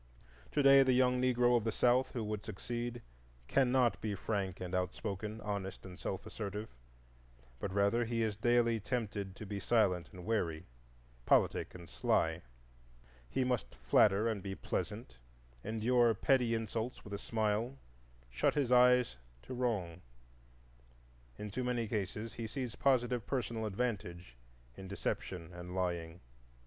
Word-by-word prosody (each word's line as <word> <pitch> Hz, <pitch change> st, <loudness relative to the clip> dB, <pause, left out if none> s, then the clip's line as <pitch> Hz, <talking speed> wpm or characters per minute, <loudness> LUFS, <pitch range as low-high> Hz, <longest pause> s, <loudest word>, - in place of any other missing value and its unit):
To 145 Hz, -, +2 dB
day 135 Hz, 0 st, +8 dB
the 130 Hz, -1 st, +4 dB
young 125 Hz, 0 st, +3 dB
Negro 125 Hz, -1 st, +4 dB
of 115 Hz, -, +2 dB
the 115 Hz, -, 0 dB
South 125 Hz, +4 st, +3 dB
who 120 Hz, -4 st, -2 dB
would 105 Hz, -1 st, -3 dB
succeed 120 Hz, +3 st, -5 dB, 0.4 s
cannot 130 Hz, -, +3 dB
be 105 Hz, -2 st, -2 dB
frank 95 Hz, -2 st, -2 dB
and 90 Hz, 0 st, -5 dB
outspoken, 100 Hz, +3 st, -3 dB
honest 100 Hz, -3 st, -4 dB
and 90 Hz, 0 st, -10 dB
self 95 Hz, -, -4 dB
assertive, 105 Hz, 0 st, -5 dB, 0.9 s
but 100 Hz, -, -3 dB
rather 100 Hz, +4 st, +2 dB
he 115 Hz, 0 st, 0 dB
is 110 Hz, -2 st, -1 dB
daily 115 Hz, +1 st, +3 dB
tempted 105 Hz, -4 st, -3 dB
to 110 Hz, -, -8 dB
be 100 Hz, 0 st, -4 dB
silent 100 Hz, -7 st, +2 dB
and 90 Hz, -3 st, -10 dB
wary, 90 Hz, -7 st, -1 dB, 0.6 s
politic -, -, +3 dB
and 85 Hz, -2 st, -10 dB
sly; -, -, +1 dB, 0.9 s
he 130 Hz, -, 0 dB
must 125 Hz, -, -1 dB
flatter 100 Hz, -, +4 dB
and 110 Hz, -4 st, -1 dB
be 95 Hz, 0 st, -5 dB
pleasant, 65 Hz, -7 st, -4 dB, 0.4 s
endure 115 Hz, +2 st, +3 dB
petty 125 Hz, +1 st, +3 dB
insults 115 Hz, +2 st, -3 dB
with 100 Hz, -, -9 dB
a 100 Hz, -, -3 dB
smile, 110 Hz, +4 st, -1 dB, 0.5 s
shut 60 Hz, -, +1 dB
his 140 Hz, -4 st, +1 dB
eyes 125 Hz, -, +5 dB, 0.3 s
to -, -, -7 dB
wrong; 105 Hz, -9 st, -1 dB, 1.4 s
in 105 Hz, -1 st, -6 dB
too 130 Hz, +6 st, -2 dB
many 120 Hz, -2 st, -1 dB
cases 105 Hz, +1 st, -3 dB
he 115 Hz, -1 st, -5 dB
sees 125 Hz, 0 st, -4 dB
positive 125 Hz, -4 st, +1 dB
personal 115 Hz, -4 st, -2 dB
advantage 95 Hz, -, -3 dB, 0.4 s
in 95 Hz, -, -9 dB
deception 90 Hz, -2 st, -4 dB
and 90 Hz, +1 st, -7 dB
lying. 85 Hz, -2 st, -2 dB
110 Hz, 145 wpm, -34 LUFS, 95-120 Hz, 1.4 s, day